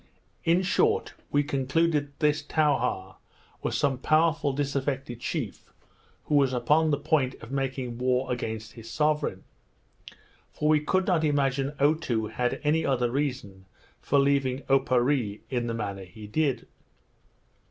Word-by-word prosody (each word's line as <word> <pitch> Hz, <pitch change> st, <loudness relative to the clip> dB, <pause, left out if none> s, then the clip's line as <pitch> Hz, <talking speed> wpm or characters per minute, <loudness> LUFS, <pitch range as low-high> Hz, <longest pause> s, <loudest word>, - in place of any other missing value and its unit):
In 170 Hz, +2 st, +3 dB
short, 440 Hz, -, +1 dB, 0.2 s
we 145 Hz, 0 st, +2 dB
concluded 145 Hz, +2 st, +1 dB
that 140 Hz, -, -28 dB
this 150 Hz, 0 st, +2 dB
Towha 125 Hz, -11 st, 0 dB, 0.4 s
was -, -, -1 dB
some 135 Hz, -3 st, +1 dB
powerful 155 Hz, 0 st, +2 dB
disaffected 135 Hz, -3 st, -2 dB
chief, 125 Hz, -, -4 dB, 0.5 s
who -, -, -4 dB
was 140 Hz, -3 st, +4 dB
upon 150 Hz, +6 st, +3 dB
the 145 Hz, -, +2 dB
point 140 Hz, -3 st, +1 dB
of 115 Hz, -, -12 dB
making 130 Hz, -3 st, -3 dB
war 125 Hz, +1 st, +1 dB
against 110 Hz, -2 st, -5 dB
his 115 Hz, -1 st, -11 dB
sovereign; 150 Hz, -5 st, 0 dB, 1.1 s
for 150 Hz, -, -1 dB
we 155 Hz, -1 st, +5 dB
could 185 Hz, +5 st, +1 dB
not 175 Hz, -5 st, +2 dB
imagine 140 Hz, -1 st, +1 dB
Otoo 140 Hz, -7 st, +1 dB
had 125 Hz, -1 st, -1 dB
any 155 Hz, +2 st, +2 dB
other 125 Hz, -3 st, +1 dB
reason 125 Hz, -9 st, -3 dB, 0.3 s
for 140 Hz, -, +1 dB
leaving 140 Hz, -1 st, +2 dB
Oparree 130 Hz, -4 st, +1 dB
in 120 Hz, -2 st, -1 dB
the 115 Hz, -, -2 dB
manner 100 Hz, -3 st, -4 dB
he 105 Hz, +4 st, -12 dB
did. 130 Hz, +2 st, 0 dB
135 Hz, 140 wpm, -27 LUFS, 120-150 Hz, 1.1 s, we